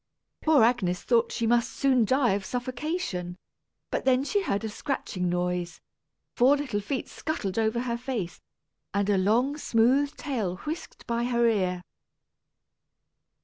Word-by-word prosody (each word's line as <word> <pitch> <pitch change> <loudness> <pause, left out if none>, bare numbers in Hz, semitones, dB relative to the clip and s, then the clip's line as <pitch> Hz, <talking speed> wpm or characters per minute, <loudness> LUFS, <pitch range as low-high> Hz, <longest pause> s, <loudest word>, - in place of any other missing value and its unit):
Poor 310 -6 +5
Agnes 195 -7 +1
thought 235 -2 +2
she 230 - -1
must 235 +1 +3
soon 260 -4 +2
die 260 0 +3
of 195 0 -1
suffocation, 245 - -3 0.5
but - - +1
just - - -14
then 260 0 +4
she 405 +8 0
heard 215 - -1
a 220 - -2
scratching 210 - -3
noise; 180 0 -2 0.6
four 265 +4 +5
little 260 -8 -2
feet 255 +6 -3
scuttled 225 - -3
over 220 +2 +1
her 235 -1 -2
face, 235 -8 -4 0.5
and 200 0 +2
a 200 - +3
long 235 +9 +2
smooth 270 +3 +2
tail 225 - -2
whisked 315 +3 -6
by 235 0 -1
her 235 -1 +2
ear. 185 -5 0
235 Hz, 145 wpm, -27 LUFS, 200-265 Hz, 0.6 s, Poor